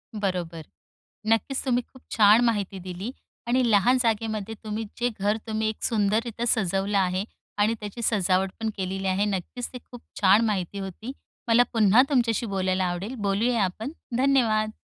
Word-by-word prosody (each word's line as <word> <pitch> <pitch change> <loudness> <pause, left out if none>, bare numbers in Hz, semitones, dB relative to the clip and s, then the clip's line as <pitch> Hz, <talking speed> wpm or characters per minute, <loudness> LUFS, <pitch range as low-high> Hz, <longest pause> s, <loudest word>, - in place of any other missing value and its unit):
बरोबर. 175 -6 -3 0.6
नक्कीच 225 +5 +1
तुम्ही 250 -1 +2
खूप 260 - -19
छान 215 +1 +6
माहिती 205 -4 -1
दिली 185 +6 -6 0.4
आणि 255 +2 +2
लहान 225 +6 +4
जागेमध्ये 220 -2 -1
तुम्ही 215 +1 -4
जे 245 +1 +1
घर 205 +2 +1
तुम्ही 220 0 0
एक 220 - -7
सुंदररित्या 225 +2 0
सजवलं 195 -2 +1
आहे 185 0 +1 0.3
आणि 210 +2 +3
त्याची 210 +3 -7
सजावटपण 195 +1 +1
केलेली 190 0 -3
आहे, 190 +2 +1
नक्कीच 205 +5 -3
ते - - -5
खूप 245 -2 -10 0.2
छान 205 +4 +5
माहिती 200 -2 -2
होती. 195 +6 -6 0.4
मला 235 +1 +5
पुन्हा 220 +1 +5
तुमच्याशी 235 -4 +1
बोलायला 190 -2 0
आवडेल. 180 +8 -3
बोलूया 210 +2 +1
आपण. 215 +8 -3 0.3
धन्यवाद. 230 -5 +2
210 Hz, 150 wpm, -25 LUFS, 195-230 Hz, 0.6 s, छान